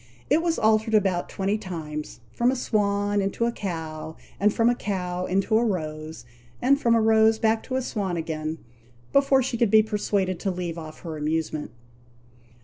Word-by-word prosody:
It 305 +3 +5
was 335 -1 0
altered 220 0 +3
about 190 -4 +1
twenty 200 +2 -1
times 155 -6 -6
from 240 +1 +2
a 260 - +1
swan 205 -3 0
into 195 +4 -1
a 235 - +1
cow, 160 -6 -5 0.2
and 210 +1 +4
from 230 +2 +2
a 240 - +5
cow 180 -5 -3
into 195 +4 +2
a - - +1
rose, 155 - -3 0.3
and 280 +3 +3
from 235 -1 +4
a - - +4
rose 220 0 +4
back 220 0 +2
to 260 - -3
a 260 - 0
swan 195 -7 -2
again, 160 -1 -3 0.6
before 275 -1 +4
she 240 -2 -3
could 235 - +3
be 215 +1 +6
persuaded 205 -4 -1
to 195 - -1
leave 175 -2 -4
off 155 -1 -10
her 160 -3 -6
amusement. 155 0 -2
200 Hz, 180 wpm, -25 LUFS, 165-225 Hz, 0.6 s, be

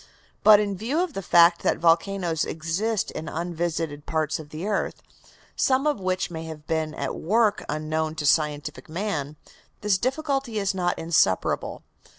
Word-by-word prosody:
But 215 -1 +8
in 205 -2 -1
view 235 - -1
of 360 -5 -4
the 195 - -4
fact 170 -1 +5
that - - +1
volcanoes 170 0 +2
exist 180 +7 -2
in 155 +1 -6
unvisited 165 -3 -3
parts 155 -1 -1
of 150 -2 -10
the 155 +4 -6
earth, 210 -1 -2 0.5
some 265 +1 +2
of 300 -7 +1
which 185 -1 -1
may 165 -1 -5
have 155 -2 -9
been 160 -1 -1
at - - -3
work 210 +4 +1
unknown 155 +1 -2
to 155 -2 -3
scientific 150 +1 0
man, 160 -5 -3 0.5
this 205 -2 +2
difficulty 270 -1 -1
is 200 -1 0
not 180 -2 0
insuperable. 160 - +1
170 Hz, 160 wpm, -25 LUFS, 155-205 Hz, 0.5 s, But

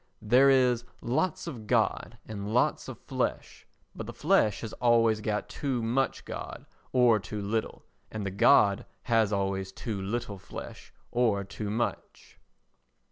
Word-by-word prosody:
There 125 +5 +5
is 125 -3 +4 0.2
lots 150 +8 -1
of 120 -10 -7
God 115 0 0
and 105 -1 -5
lots 125 +2 +1
of - - -7
flesh, - - -3 0.3
but - - -6
the - - -6
flesh 105 -2 +2
has 110 - -6
always 115 -2 +4
got 105 0 -2
too 130 -5 -2
much 125 +4 0
God - - -7 0.3
or 120 -4 +5
too 100 +3 -6
little, 105 +2 -3 0.3
and 110 -2 -5
the 100 - -2
God 100 +1 +4 0.2
has 115 -3 +2
always 95 -1 -1
too 100 0 -5
little 100 0 -4
flesh - - -9 0.2
or 115 -5 +2
too 100 +2 -6
much. 115 +3 -4
110 Hz, 145 wpm, -28 LUFS, 100-120 Hz, 0.3 s, There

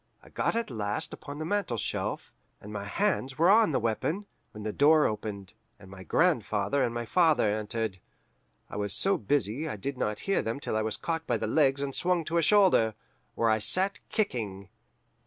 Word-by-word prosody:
I - - -16
got - - -1
at 230 - -2
last 105 -3 -1
upon 145 +1 -8
the 155 - -4
mantelshelf, 170 - -2 0.3
and 105 +1 -10
my 100 -1 -4
hands 135 - -1
were 170 +4 +5
on 220 -4 +5
the 135 - +1
weapon, 150 - -1 0.2
when 105 - -10
the 105 -1 -3
door 150 +2 +5
opened, 105 -2 -4 0.2
and 95 -3 -15
my 95 -1 -10
grandfather 100 - +1
and 120 - 0
my 120 0 -4
father 155 - +3
entered. 110 -2 -3 0.7
I - - -7
was 105 -1 -2
so 195 0 +2
busy 140 +5 0
I - - -4
did 130 +6 -5
not 105 0 -2
hear 195 - +1
them 115 +4 -3
till 125 - -3
I 110 - +1
was 110 -1 -2
caught 165 -1 -3
by 120 - +1
the 110 - -3
legs 140 +3 +2
and 140 -1 -3
swung 175 0 0
to 170 - -1
a - - +4
shoulder, 175 - +4 0.4
where 115 -1 +2
I 110 - +2
sat 185 - +1
kicking. 105 - -2
120 Hz, 195 wpm, -28 LUFS, 105-160 Hz, 0.7 s, were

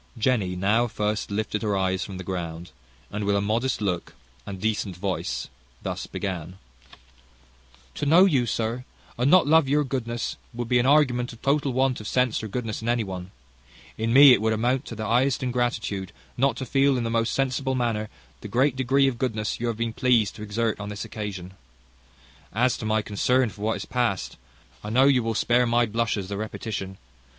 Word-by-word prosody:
Jenny 110 -6 +1
now 105 +6 +2 0.4
lifted 105 +1 -2
her 105 -3 0
eyes 95 0 0
from 95 -2 -7
the 95 - -6
ground, 85 -2 -5 0.4
and 105 +1 -3
with 100 0 +1
a - - +2
modest 115 +5 0
look 90 -4 -2 0.3
and 95 -1 -6
decent 105 -2 -1
voice 90 -10 -3 0.4
thus - - -4
began: 90 -2 -5 1.4
"To 145 - -3
know 170 +6 +7
you, 135 -10 +2
sir, 115 +2 -2 0.3
and 125 +3 +1
not 185 +2 +6
love 155 0 +4
your 150 +1 +3
goodness, 120 -4 -3 0.2
would 120 -1 -3
be 125 +1 +3
an 120 - +2
argument 130 -5 +3
of 115 - -16
total 140 0 +1
want 130 -1 +1
of 105 - -7
sense 125 -1 +1
or 110 - -5
goodness 115 0 -4
in 115 - -2
any 120 -1 +1
one. 95 -2 -6 0.7
In 115 +1 -1
me 135 +1 +9
it 115 - +2
would 110 0 +2
amount 125 +5 0
to 115 - -7
the 110 0 -4
highest 125 +4 +2
ingratitude, 120 -6 -2 0.2
not 135 +2 +1
to 130 - -4
feel, 135 +1 +2
in 120 - -1
the 115 - -2
most 115 0 +1
sensible 135 0 0
manner, 115 -4 -1 0.3
the - - -8
great 125 +5 +2
degree 135 +1 +3
of 125 -3 -2
goodness 110 -5 -2
you 120 - -2
have 115 -2 -2
been 115 -1 -2
pleased 115 -5 +2
to - - -10
exert 110 +1 -1
on 100 0 -5
this 105 -1 -5
occasion. 100 -5 -6 1.0
As 125 +3 +2
to - - -5
my 110 0 +1
concern 125 +5 +1
for 100 +1 -13
what 110 +1 0
is - - -6
past, 120 -7 -1 0.5
I - - -5
know 125 +5 +4
you 135 -3 +4
will 115 -1 -2
spare 120 +2 +2
my 120 +1 +3
blushes 110 -3 -1
the 100 0 -4
repetition. 105 -2 -5
115 Hz, 195 wpm, -25 LUFS, 105-125 Hz, 1.4 s, me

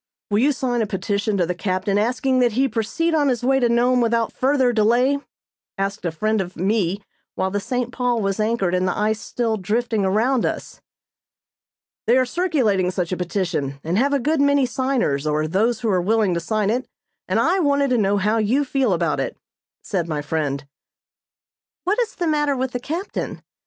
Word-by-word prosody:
"Will 205 - +3
you 280 +5 +4
sign 250 -3 -1
a 220 - 0
petition 200 +2 -1
to 175 - +2
the 180 - -2
captain 190 +2 -1
asking 255 +4 +1
that 240 -3 +3
he 265 +4 +2
proceed 245 +9 -1
on 295 -2 +3
his 245 -2 -1
way 270 +1 +3
to 240 -2 +2
Nome 245 +1 +3
without 230 -1 +1
further 260 -2 +2
delay?" 240 +6 +3 0.6
asked 195 +1 -3
a 170 - 0
friend 215 +6 0
of 180 -1 -6
me 195 +1 0 0.3
while 190 - -1
the 205 - 0
"St. 245 +4 -2
Paul" 245 -2 0
was 195 -1 -1
anchored 215 -4 0
and 185 0 +1
the - - -1
ice 215 +1 0
still 230 -2 -1
drifting 220 +2 -1
around 225 +7 +2
us. - - -4 1.3
"They 240 +3 +5
are 260 - +3
circulating 250 - +1
such 180 -1 -2
a - - 0
petition, 170 -6 -2
and 165 +3 -1
have 280 +3 +2
a 285 - +3
good 295 +3 +1
many 285 -1 +4
signers, 250 - 0
or 155 +1 0
those 220 +8 +1
who 230 - 0
are 185 -2 +2
willing 210 0 +2
to 170 - 0
sign 210 +4 0
it, 250 +3 -2 0.4
and - - +1
I 385 - +2
wanted 280 -4 +2
to 250 - +3
know 200 0 +2
how 210 +3 +1
you 250 +7 +1
feel 260 -5 +1
about 170 -1 0
it," - - -3 0.5
said 175 -5 -2
my 150 -2 -2
friend. 145 -2 -2 1.2
"What 405 +6 +1
is 470 -1 -1
the 350 - -2
matter 295 -3 +1
with 260 0 -2
the 245 - -3
captain? 335 +10 -4
225 Hz, 200 wpm, -22 LUFS, 190-260 Hz, 1.3 s, They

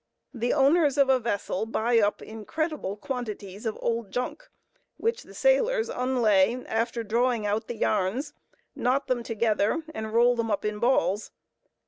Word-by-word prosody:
The 240 -1 -1
owners 290 +1 +3
of 275 -1 +4
a 260 -1 +5
vessel 220 -2 -2
buy 230 +1 +2
up 205 -1 +1
incredible 225 - -4
quantities 215 -4 -5
of 220 - -3
"old 230 -3 -1
junk," 250 - -4 0.5
which 460 +2 -1
the - - -15
sailors - - +2
unlay 240 -3 +2
after 230 +1 -1
drawing 230 +1 +1
out 210 +2 -1
the 240 - -4
yarns, 215 +10 0 0.4
knot 265 +3 +1
them 250 -2 0
together 225 +4 0
and 220 -3 -5
roll 240 +2 +4
them 230 -1 -1
up 205 -1 -1
in 210 0 -2
balls. 230 -4 +1
235 Hz, 150 wpm, -27 LUFS, 215-265 Hz, 0.5 s, a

